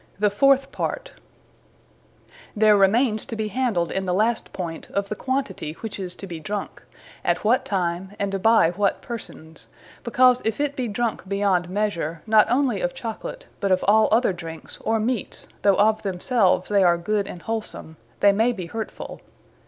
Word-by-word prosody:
The 205 Hz, +1 st, +2 dB
fourth 275 Hz, +5 st, +3 dB
Part. -, -, -4 dB, 1.4 s
There 215 Hz, 0 st, +5 dB
remaines 215 Hz, +3 st, +3 dB
to 230 Hz, -, -5 dB
be 215 Hz, -1 st, -2 dB
handled 210 Hz, -7 st, 0 dB
in 190 Hz, 0 st, -2 dB
the 180 Hz, -1 st, 0 dB
last 220 Hz, +3 st, 0 dB
Point, 170 Hz, -3 st, -6 dB
of 200 Hz, 0 st, -2 dB
the 210 Hz, -, -2 dB
Quantity, 260 Hz, -, -3 dB
which 220 Hz, -2 st, -5 dB
is 180 Hz, -2 st, -5 dB
to -, -, -8 dB
be 170 Hz, -4 st, -7 dB
drunke: 205 Hz, +5 st, -5 dB, 0.4 s
at -, -, 0 dB
what 235 Hz, +4 st, +2 dB
Time; 185 Hz, 0 st, -2 dB
and 195 Hz, -1 st, -2 dB
by 220 Hz, -6 st, +5 dB
what 200 Hz, +2 st, 0 dB
persons: 160 Hz, -9 st, -8 dB, 0.4 s
because 250 Hz, +1 st, +4 dB
if 220 Hz, +2 st, -1 dB
it 290 Hz, -1 st, -1 dB
be 255 Hz, -3 st, -2 dB
drunk 225 Hz, -2 st, -2 dB
beyond 195 Hz, -3 st, +1 dB
measure, 170 Hz, -5 st, -2 dB
not 215 Hz, -1 st, +5 dB
onely 250 Hz, -4 st, +1 dB
of 265 Hz, 0 st, -2 dB
Chocolate, 255 Hz, -, -6 dB
but 200 Hz, -2 st, 0 dB
of 185 Hz, -, +2 dB
all 215 Hz, +2 st, +5 dB
other 225 Hz, -2 st, +3 dB
drinkes, 165 Hz, -2 st, -8 dB
or 225 Hz, 0 st, +1 dB
meates, 230 Hz, 0 st, -2 dB
though 200 Hz, -1 st, +4 dB
of 215 Hz, +1 st, +3 dB
themselves 190 Hz, 0 st, +1 dB
they 205 Hz, -1 st, +3 dB
are 175 Hz, -1 st, +4 dB
good 200 Hz, +3 st, -1 dB
and 175 Hz, -, -9 dB
wholsome, 220 Hz, -7 st, -4 dB, 0.3 s
they 200 Hz, -, +7 dB
may 225 Hz, +5 st, +2 dB
be 185 Hz, -7 st, -6 dB
hurtfull. 225 Hz, -1 st, -6 dB
210 Hz, 175 wpm, -23 LUFS, 185-230 Hz, 1.4 s, they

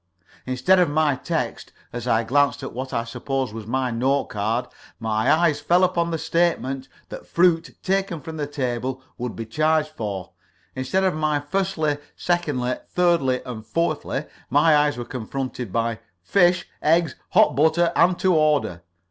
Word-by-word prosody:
Instead 130 Hz, +9 st, +3 dB
of 180 Hz, -, +3 dB
my 150 Hz, -1 st, +2 dB
text, -, -, -3 dB, 0.2 s
as 120 Hz, 0 st, -5 dB
I 115 Hz, -1 st, +3 dB
glanced 140 Hz, +2 st, +2 dB
at -, -, -6 dB
what 130 Hz, +2 st, -5 dB
I 115 Hz, -, -1 dB
supposed 130 Hz, +1 st, -3 dB
was 110 Hz, -2 st, -7 dB
my 130 Hz, +1 st, 0 dB
note 130 Hz, +4 st, 0 dB
card, 110 Hz, +4 st, -1 dB, 0.3 s
my 110 Hz, +3 st, +1 dB
eyes 155 Hz, -2 st, +3 dB
fell 175 Hz, +4 st, +3 dB
upon 170 Hz, -2 st, +1 dB
the 165 Hz, -, -1 dB
statement 160 Hz, -5 st, 0 dB, 0.2 s
that -, -, -9 dB
fruit 170 Hz, -1 st, +2 dB
taken 190 Hz, -3 st, 0 dB
from 160 Hz, +3 st, -8 dB
the 145 Hz, -1 st, -2 dB
table 130 Hz, -2 st, -3 dB, 0.2 s
would 125 Hz, -1 st, -4 dB
be 115 Hz, -, -5 dB
charged 155 Hz, +5 st, +1 dB
for; 105 Hz, -, -5 dB, 0.4 s
instead 130 Hz, +9 st, 0 dB
of 190 Hz, -, +2 dB
my 155 Hz, -1 st, 0 dB
firstly, 155 Hz, -2 st, -1 dB, 0.2 s
secondly, 145 Hz, -8 st, -1 dB
thirdly, 170 Hz, -8 st, +2 dB
and 120 Hz, -4 st, -6 dB
fourthly, 155 Hz, +6 st, -1 dB, 0.2 s
my 150 Hz, +3 st, +5 dB
eyes 145 Hz, -1 st, +2 dB
were 120 Hz, -, -4 dB
confronted 125 Hz, -1 st, -5 dB
by 115 Hz, +1 st, -1 dB, 0.2 s
Fish, 180 Hz, -, +3 dB
Eggs, 160 Hz, -2 st, +3 dB, 0.2 s
Hot -, -, +5 dB
Bread, 160 Hz, +4 st, +3 dB
and 180 Hz, 0 st, +4 dB
To 185 Hz, -1 st, +2 dB
Order. 150 Hz, -, +2 dB
145 Hz, 160 wpm, -23 LUFS, 125-165 Hz, 0.4 s, my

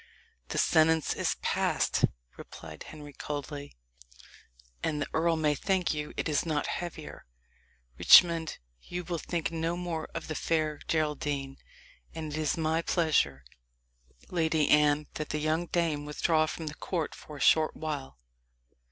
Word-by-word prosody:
"The -, -, -4 dB
sentence 160 Hz, -1 st, +3 dB
is -, -, 0 dB
passed," -, -, +2 dB, 0.3 s
replied 80 Hz, -1 st, -10 dB
Henry 145 Hz, -2 st, -10 dB
coldly; 145 Hz, -, -6 dB, 1.0 s
"and 150 Hz, -2 st, -1 dB
the 145 Hz, -, -2 dB
earl 165 Hz, +1 st, +2 dB
may 155 Hz, -2 st, +2 dB
thank 185 Hz, +2 st, 0 dB
you 150 Hz, -1 st, -4 dB
it -, -, -1 dB
is 150 Hz, -2 st, +1 dB
not 155 Hz, -3 st, -1 dB
heavier. 170 Hz, -, -6 dB, 0.7 s
Richmond, 165 Hz, -3 st, +7 dB, 0.2 s
you 180 Hz, 0 st, -5 dB
will 170 Hz, -1 st, -3 dB
think 170 Hz, -1 st, -2 dB
no 165 Hz, +1 st, -1 dB
more 170 Hz, -3 st, -4 dB
of 165 Hz, -, -4 dB
the 155 Hz, -, -3 dB
fair 155 Hz, -2 st, 0 dB
Geraldine; 145 Hz, -3 st, -1 dB, 0.6 s
and 160 Hz, -2 st, -5 dB
it -, -, -3 dB
is 155 Hz, +1 st, 0 dB
my 160 Hz, 0 st, +1 dB
pleasure, 150 Hz, -, +1 dB, 0.9 s
Lady 160 Hz, -3 st, +2 dB
Anne, 150 Hz, 0 st, +4 dB
that 155 Hz, -, -5 dB
the 150 Hz, -, -1 dB
young 155 Hz, +3 st, 0 dB
dame 165 Hz, -4 st, 0 dB
withdraw 155 Hz, +1 st, +2 dB
from 160 Hz, -, -5 dB
the 150 Hz, -, -4 dB
court 165 Hz, +1 st, -3 dB
for 150 Hz, -, -11 dB
a -, -, -10 dB
short 155 Hz, +1 st, +4 dB
while." 145 Hz, -, -5 dB
155 Hz, 145 wpm, -29 LUFS, 150-165 Hz, 1.0 s, Richmond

